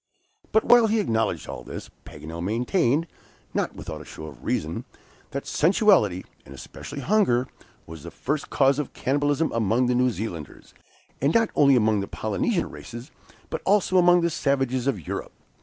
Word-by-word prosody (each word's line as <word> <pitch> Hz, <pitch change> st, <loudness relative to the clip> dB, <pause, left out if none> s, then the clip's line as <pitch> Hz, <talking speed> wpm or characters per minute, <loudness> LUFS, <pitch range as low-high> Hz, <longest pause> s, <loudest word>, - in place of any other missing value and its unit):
But 220 Hz, -, +3 dB
while 240 Hz, -2 st, +6 dB
he 220 Hz, +1 st, +1 dB
acknowledged 110 Hz, -, -1 dB
all -, -, -7 dB
this, -, -, -8 dB
Paganel 80 Hz, +3 st, -8 dB
maintained, 125 Hz, -, +1 dB, 0.5 s
not -, -, -1 dB
without -, -, -7 dB
a -, -, -9 dB
show -, -, -10 dB
of 75 Hz, -5 st, -11 dB
reason, 80 Hz, +2 st, -2 dB, 0.5 s
that 140 Hz, -, -5 dB
sensuality, 165 Hz, -, +3 dB, 0.2 s
and 70 Hz, -, -12 dB
especially 140 Hz, -, -8 dB
hunger, 140 Hz, -, +2 dB, 0.4 s
was 80 Hz, -1 st, -10 dB
the -, -, -8 dB
first 145 Hz, +2 st, -3 dB
cause 135 Hz, +1 st, +3 dB
of 150 Hz, -, -4 dB
cannibalism 145 Hz, +3 st, 0 dB
among 115 Hz, +2 st, +1 dB
the 125 Hz, -, +1 dB
New 125 Hz, +1 st, +3 dB
Zealanders, 95 Hz, -, -7 dB, 0.5 s
and 140 Hz, +4 st, +2 dB
not 225 Hz, -1 st, +3 dB
only 140 Hz, -2 st, +5 dB
among 110 Hz, -3 st, +3 dB
the 100 Hz, -, -3 dB
Polynesian 135 Hz, -, -1 dB
races, 120 Hz, +4 st, -9 dB, 0.4 s
but -, -, -3 dB
also 190 Hz, -2 st, +3 dB
among 175 Hz, 0 st, +5 dB
the 170 Hz, 0 st, +1 dB
savages 135 Hz, -4 st, 0 dB
of 100 Hz, -, -1 dB
Europe. -, -, -5 dB
130 Hz, 165 wpm, -25 LUFS, 110-165 Hz, 0.5 s, while